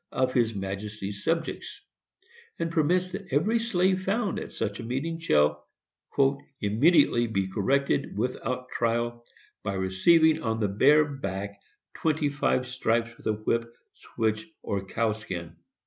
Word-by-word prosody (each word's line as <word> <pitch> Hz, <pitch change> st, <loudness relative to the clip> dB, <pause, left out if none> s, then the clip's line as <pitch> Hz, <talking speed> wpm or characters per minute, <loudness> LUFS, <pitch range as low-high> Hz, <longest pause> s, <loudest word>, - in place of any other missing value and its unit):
of 130 Hz, 0 st, 0 dB
his 115 Hz, -3 st, +2 dB
majesty's 100 Hz, +1 st, -5 dB
subjects, 165 Hz, -1 st, -2 dB, 0.8 s
and 165 Hz, 0 st, -2 dB
permits 175 Hz, +3 st, +2 dB
that 195 Hz, -2 st, -7 dB
every 210 Hz, -, +2 dB
slave 190 Hz, -4 st, +1 dB
found 205 Hz, +2 st, 0 dB
at -, -, -7 dB
such 100 Hz, -1 st, -3 dB
a -, -, -5 dB
meeting 140 Hz, +8 st, -3 dB
shall 75 Hz, -, +2 dB, 0.9 s
"immediately 120 Hz, -, +4 dB
be 95 Hz, -4 st, -1 dB
corrected, 135 Hz, +5 st, 0 dB
WITHOUT 125 Hz, +2 st, -2 dB
TRIAL, 120 Hz, 0 st, -1 dB, 0.4 s
by 100 Hz, -, -3 dB
receiving 155 Hz, -, +4 dB
on 110 Hz, -1 st, -1 dB
the 105 Hz, -2 st, +1 dB
bare 145 Hz, +10 st, +5 dB
back 100 Hz, -8 st, -5 dB, 0.3 s
twenty 155 Hz, -2 st, 0 dB
five 135 Hz, -2 st, +1 dB
stripes 115 Hz, -2 st, 0 dB
with -, -, -8 dB
a 110 Hz, -, +3 dB
whip, 115 Hz, +2 st, -1 dB, 0.2 s
switch, 110 Hz, +1 st, -2 dB, 0.2 s
or 100 Hz, -1 st, -2 dB
cowskin." 105 Hz, -6 st, -3 dB
120 Hz, 130 wpm, -27 LUFS, 105-155 Hz, 0.9 s, bare